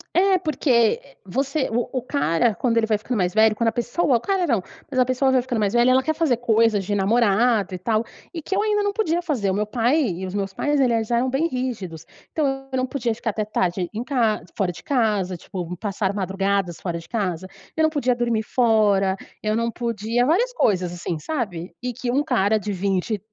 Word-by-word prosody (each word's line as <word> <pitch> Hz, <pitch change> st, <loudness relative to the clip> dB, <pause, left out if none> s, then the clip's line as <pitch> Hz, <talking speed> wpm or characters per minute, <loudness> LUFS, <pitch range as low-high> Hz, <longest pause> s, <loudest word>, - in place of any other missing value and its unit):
É, 380 Hz, +1 st, +4 dB
porque, 310 Hz, -3 st, -2 dB
eh, 235 Hz, +3 st, +2 dB
você 270 Hz, +7 st, -1 dB
o 240 Hz, +1 st, -1 dB
o 260 Hz, -, -1 dB
cara, 240 Hz, -, +1 dB
quando 230 Hz, +4 st, 0 dB
ele 225 Hz, -, +3 dB
vai 215 Hz, -1 st, +1 dB
ficando 235 Hz, +1 st, -3 dB
mais 180 Hz, -1 st, 0 dB
velho, 220 Hz, 0 st, +4 dB
quando 230 Hz, 0 st, +2 dB
a -, -, -2 dB
pessoa, 245 Hz, +4 st, +1 dB
o -, -, -5 dB
cara 385 Hz, +1 st, 0 dB
não, 235 Hz, -, +1 dB, 0.3 s
mas 255 Hz, -3 st, -1 dB
a 250 Hz, -, +5 dB
pessoa 255 Hz, +1 st, +2 dB
vai 255 Hz, -, +3 dB
ficando 245 Hz, -1 st, -3 dB
mais 205 Hz, 0 st, +1 dB
velha, 240 Hz, +1 st, +4 dB
ela 260 Hz, +1 st, +4 dB
quer 315 Hz, -, 0 dB
fazer 310 Hz, -7 st, +1 dB
coisas 225 Hz, -4 st, +2 dB
de 205 Hz, -, -2 dB
namorado 210 Hz, 0 st, +2 dB
e 180 Hz, -, -4 dB
tal, 220 Hz, +3 st, 0 dB, 0.3 s
e 340 Hz, -, -5 dB
que 385 Hz, +5 st, -3 dB
eu 410 Hz, -, +2 dB
ainda 420 Hz, -1 st, +1 dB
não 405 Hz, 0 st, 0 dB
podia 350 Hz, -5 st, 0 dB
fazer. 250 Hz, -, -1 dB
O 190 Hz, -, 0 dB
meu 210 Hz, -, 0 dB
pai 240 Hz, +7 st, +1 dB
e 185 Hz, -2 st, -3 dB
os 185 Hz, -, -6 dB
meus 195 Hz, -1 st, -2 dB
pais 290 Hz, +7 st, 0 dB
eles 230 Hz, -4 st, +2 dB
eram 245 Hz, +2 st, +1 dB
bem 290 Hz, +5 st, +1 dB
rígidos. 235 Hz, -, -4 dB, 0.3 s
Então, 270 Hz, -3 st, -1 dB
eu 260 Hz, -, -1 dB
não 255 Hz, -, +1 dB
podia 245 Hz, -3 st, -2 dB
ficar 225 Hz, -1 st, -2 dB
até 215 Hz, +1 st, -2 dB
tarde 180 Hz, -3 st, -1 dB
em 220 Hz, +2 st, -4 dB
ca 235 Hz, -, +1 dB
fora 195 Hz, -4 st, 0 dB
de 175 Hz, -, -12 dB
casa, 210 Hz, -8 st, +1 dB
tipo, 180 Hz, 0 st, -6 dB
passar 200 Hz, 0 st, -2 dB
madrugadas 195 Hz, -2 st, -1 dB
fora 170 Hz, -2 st, -3 dB
de 165 Hz, -, -15 dB
casa, 185 Hz, -5 st, -2 dB, 0.3 s
eu 320 Hz, -, 0 dB
não 315 Hz, -, +4 dB
podia 270 Hz, -5 st, +1 dB
dormir 235 Hz, -2 st, 0 dB
fora, 210 Hz, -6 st, +3 dB, 0.3 s
eu 215 Hz, 0 st, 0 dB
não 230 Hz, 0 st, 0 dB
podia 230 Hz, 0 st, -1 dB
várias 460 Hz, +11 st, +2 dB
coisas, 185 Hz, -, +1 dB
assim, 175 Hz, -2 st, -4 dB
sabe. 190 Hz, -, -4 dB
E 250 Hz, -, -2 dB
que 245 Hz, 0 st, -3 dB
um 285 Hz, +3 st, +2 dB
cara 215 Hz, -7 st, +2 dB
de 205 Hz, +1 st, -4 dB
vinte 195 Hz, +2 st, -1 dB
230 Hz, 225 wpm, -23 LUFS, 200-260 Hz, 0.3 s, a